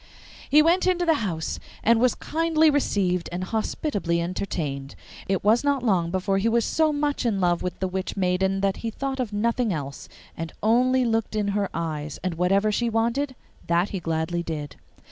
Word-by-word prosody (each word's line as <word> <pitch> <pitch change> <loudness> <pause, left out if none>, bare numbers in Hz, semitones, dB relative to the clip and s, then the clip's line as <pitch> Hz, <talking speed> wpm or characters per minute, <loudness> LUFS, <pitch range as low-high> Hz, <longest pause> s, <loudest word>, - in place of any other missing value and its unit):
He 300 +2 +6
went 350 +3 +3
into 355 -1 +2
the 325 - +4
house, 165 -7 -3 0.2
and 230 0 +4
was 250 +1 +3
kindly 320 -1 +2
received 190 -11 0
and 180 +1 -3
hospitably 205 - -1
entertained. 160 -6 -3 0.3
It 195 -1 0
was 220 +5 +4
not 280 -3 +1
long 185 -7 +2
before 190 +2 0
he 225 +4 +2
was 235 0 +2
so 315 -1 +2
much 290 -1 -1
in 220 -5 0
love 175 -2 +2
with 180 -1 -4
the 190 - 0
witch 190 +2 -4
maiden 190 +1 +1
that 195 -1 +1
he 230 - -3
thought 270 +4 -4
of 245 -4 -2
nothing 230 +2 0
else, 140 -5 -5 0.3
and 165 -1 -6
only 250 +3 +3
looked 225 -1 0
in 210 -1 0
her 200 -1 0
eyes, 155 -3 -4
and 185 -2 -1
whatever 195 +5 +2
she 235 +3 0
wanted, 235 +5 0 0.3
that 170 +3 +2
he 195 - -3
gladly 165 +1 -1
did. 150 -4 -5
200 Hz, 185 wpm, -25 LUFS, 175-245 Hz, 0.3 s, He